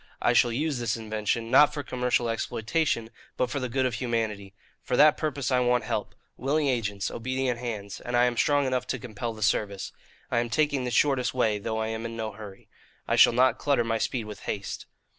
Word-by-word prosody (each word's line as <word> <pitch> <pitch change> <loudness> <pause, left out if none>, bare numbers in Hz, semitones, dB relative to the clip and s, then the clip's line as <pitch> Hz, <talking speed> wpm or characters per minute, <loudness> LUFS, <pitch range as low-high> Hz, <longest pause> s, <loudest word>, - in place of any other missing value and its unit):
I - - +2
shall 120 - +4
use 145 +2 -1
this 120 -1 -1
invention, 110 +1 -2
not 150 0 +7
for 145 -1 -5
commercial 125 -2 0
exploitation, 115 +2 -1 0.3
but 125 - 0
for 140 - -1
the 125 -1 -3
good 130 +2 0
of 125 - 0
humanity. 110 -5 -2 0.3
For 125 - -1
that 150 +1 +7
purpose 145 -4 -2
I 125 - +3
want 125 -1 +2
help - - -3 0.2
willing 145 +2 0
agents, 105 -6 -1
obedient 130 0 -2
hands; 105 -5 -5
and 120 0 -1
I 120 - +5
am 120 -1 0
strong 145 +3 +2
enough 130 -1 -1
to 125 - -2
compel 120 -1 -5
the 110 - -4
service. 100 -2 0 0.4
I 120 - +2
am 120 0 -1
taking 145 0 +1
the - - -1
shortest 130 0 +2
way, 110 -4 +1
though 110 +2 -3
I 110 0 -1
am 110 0 -4
in 115 0 -8
no 110 -1 -3
hurry. 100 -2 -11 0.4
I - - +2
shall - - +7
not 125 0 +3
clutter 140 -5 +2
my 115 -1 -1
speed 120 0 -1
with 105 -1 -8
haste. 100 -1 -4
120 Hz, 215 wpm, -27 LUFS, 110-130 Hz, 0.4 s, not